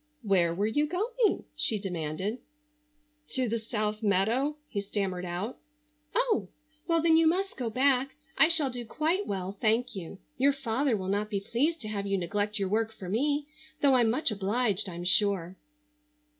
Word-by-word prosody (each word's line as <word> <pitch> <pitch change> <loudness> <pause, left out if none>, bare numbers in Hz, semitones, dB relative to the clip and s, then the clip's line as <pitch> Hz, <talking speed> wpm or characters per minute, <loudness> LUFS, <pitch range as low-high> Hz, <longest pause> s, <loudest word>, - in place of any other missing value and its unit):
"Where 180 -5 +2
were 200 +3 0
you 295 +8 +1
going?" 435 +7 0
she 290 -7 +2
demanded. 185 +3 -3 1.0
"To 260 -2 +1
the 230 +1 -1
South 215 -1 -3
meadow," 225 +9 +1
he 205 -8 -3
stammered 195 -3 -3
out. 180 +7 -4 0.6
"Oh, 450 - +1 0.4
well, 330 -1 +2
then 325 -1 +5
you 325 0 +5
must 385 +4 0
go 245 -3 -3
back. 265 +2 +2 0.2
I - - +6
shall 315 -5 +5
do 245 -1 -5
quite 320 - -1
well, 195 0 -4
thank 230 +2 +1
you. 190 0 -7 0.2
Your 280 +2 +4
father 265 -1 0
will 185 -1 -5
not 205 +2 -1
be 200 -2 -1
pleased 290 +11 -1
to 215 - -4
have 200 -2 -3
you 195 0 +1
neglect 205 +4 -1
your 195 -2 0
work 220 +3 0
for 190 -4 -9
me, 285 +7 0 0.4
though 280 -2 +5
I'm 240 -3 +4
much 245 +2 +1
obliged 205 0 0
I'm 175 0 -6
sure." 180 -1 +2
220 Hz, 170 wpm, -29 LUFS, 195-280 Hz, 1.0 s, I